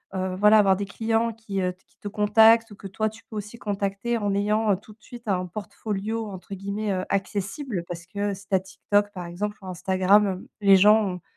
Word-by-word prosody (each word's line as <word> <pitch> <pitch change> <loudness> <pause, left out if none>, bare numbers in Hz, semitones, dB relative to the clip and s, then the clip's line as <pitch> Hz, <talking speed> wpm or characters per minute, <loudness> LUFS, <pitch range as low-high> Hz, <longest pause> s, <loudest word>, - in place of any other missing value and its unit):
heu 185 0 -2
voilà, 210 +3 +6
avoir 195 -2 +4
des 200 - -3
clients 225 +3 0
qui, 215 -3 -5
heu, 180 0 -1
qui - - -34
te - - -7
contactent 220 +2 +5
ou - - -10
que 200 - -8
toi 215 +3 -1
tu 220 +1 -15
peux 225 - -11
aussi 210 +3 -7
contacter 200 +3 -2
en 205 -3 -1
ayant 210 +1 +2
tout 210 +3 -15
de 215 - -32
suite 240 0 -12
«un 185 -3 0
portfolio» 215 +3 -4
entre 190 0 -8
guillemets, 200 +2 -3
heu, 185 0 -2
accessible. 200 - -2
Parce 170 -1 -7
que 200 +2 -2
si 200 +1 -11
tu 195 - +1
as - - +4
TikTok 205 +2 0
par 180 -2 -6
exemple 205 +5 -4
ou - - -12
Instagram, 190 +3 +3
hem, 185 -1 -4
les 200 -1 +7
gens 210 +3 +6
ont 180 -2 -4
205 Hz, 220 wpm, -25 LUFS, 190-215 Hz, -, les